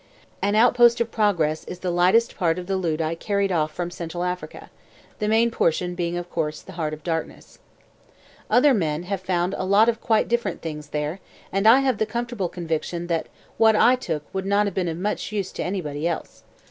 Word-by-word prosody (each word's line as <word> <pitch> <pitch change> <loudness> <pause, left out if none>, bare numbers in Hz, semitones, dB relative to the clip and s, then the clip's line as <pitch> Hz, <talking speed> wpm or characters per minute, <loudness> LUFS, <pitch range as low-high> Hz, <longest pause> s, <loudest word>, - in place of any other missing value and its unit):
An 205 +1 +1
Outpost 240 +1 +5
of 235 -1 -1
Progress 170 -8 +1
is 180 - -7
the 180 0 -3
lightest 185 +7 +3
part 165 -2 +1
of 180 - -5
the 195 +1 -1
loot 165 -4 -1
I 160 +1 -1
carried 200 +3 -1
off 155 -3 +1
from 175 +2 -4
Central 175 0 -5
Africa, 180 0 -5 0.5
the 210 - -1
main 225 +2 +3
portion 180 -2 0
being 175 -1 -2
of 175 0 -5
course 155 -3 -3
The 190 - -11
Heart 160 -4 -3
of 150 - -19
Darkness. 165 -1 -5 0.9
Other 270 +3 +5
men 160 -6 -1
have 190 +1 -3
found 180 -1 0
a - - -1
lot 200 +4 +4
of 230 -1 -2
quite 220 -2 +2
different 235 -6 -1
things 150 -2 -6
there 150 +5 -3 0.3
and 195 +3 +1
I 245 +5 +8
have 260 -5 0
the 220 - +1
comfortable 235 -4 -3
conviction 170 0 -3
that 165 - -2 0.3
what 220 -1 +6
I 245 +4 +5
took 160 -12 -4
would 190 0 -3
not 200 +1 +3
have 200 - -2
been 185 -2 -1
of 165 -1 -3
much 205 +3 -3
use 200 -3 -2
to - - -4
anybody 165 -5 -3
else. 170 - -5
180 Hz, 210 wpm, -24 LUFS, 165-210 Hz, 0.9 s, I